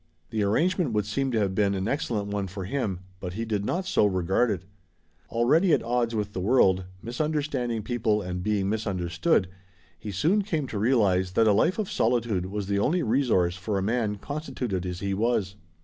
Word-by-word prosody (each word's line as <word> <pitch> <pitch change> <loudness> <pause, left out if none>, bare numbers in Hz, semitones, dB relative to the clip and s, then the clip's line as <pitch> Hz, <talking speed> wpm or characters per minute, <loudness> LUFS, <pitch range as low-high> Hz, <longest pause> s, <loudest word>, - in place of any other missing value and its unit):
The 110 - -1
arrangement 155 - +1
would 105 -2 +1
seem 135 +6 -1
to 120 - 0
have 100 -3 +1
been 100 0 +2
an 95 +1 -2
excellent 110 -6 -1
one 100 -1 -2
for 95 +1 -6
him, 100 -6 -2 0.2
but 90 -2 -5
he 115 +4 -3
did 105 -3 -1
not 180 - -1
so 185 - +3
regard 95 +5 +1
it. 100 -3 -2 0.7
Already 150 +10 +3
at - - +2
odds 120 0 0
with 105 -1 -2
the - - -3
world, 95 -3 +3 0.2
misunderstanding 125 -3 -2
people 110 -3 0
and 90 -2 -4
being 100 0 0
misunderstood, 100 - 0 0.5
he 105 - -7
soon 165 - +2
came 160 -8 -2
to 105 - -3
realize 100 -6 +2
that 115 - +4
a 105 - +5
life 165 - +2
of 215 -3 -1
solitude 110 -6 +1
was 100 +1 -3
the 100 +1 0
only 165 - +1
resource 110 -8 +2
for 100 +2 -2
a 95 - -1
man 110 -1 0
constituted 120 - -4
as 90 0 -5
he 100 -1 -1
was. 105 -2 0
105 Hz, 195 wpm, -26 LUFS, 95-125 Hz, 0.7 s, a